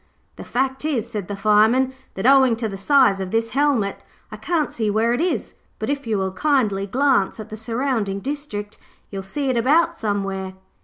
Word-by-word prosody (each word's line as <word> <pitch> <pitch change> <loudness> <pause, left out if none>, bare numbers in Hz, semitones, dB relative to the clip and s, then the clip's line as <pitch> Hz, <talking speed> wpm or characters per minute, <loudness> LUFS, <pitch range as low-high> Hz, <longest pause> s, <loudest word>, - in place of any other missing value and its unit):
'The - - -9
fact 265 +2 -2
is,' 270 -7 -1
said 205 -5 -4
the 205 - -4
Fireman, 215 +6 +3 0.2
'that 190 - -4
owing 265 -3 +6
to 225 0 -3
the 200 - -6
size 225 -1 +3
of 190 -1 -4
this 225 +2 -1
helmet 270 -8 +1 0.3
I - - -6
can't 330 -4 -1
see 220 -2 -1
where 220 +3 +2
it 245 - 0
is; 355 +1 -1 0.2
but - - -2
if 280 -3 -4
you 215 -2 0
will 190 -1 -1
kindly 210 -5 +1
glance 245 -4 +1
at 215 0 -8
the 215 - -6
surrounding 225 -3 -2
district, 235 -6 -5 0.3
you'll 195 -1 -4
see 265 +8 -2
it 245 - -1
about 320 +8 +3
somewhere.' 195 -3 -2
225 Hz, 195 wpm, -22 LUFS, 200-270 Hz, 0.3 s, owing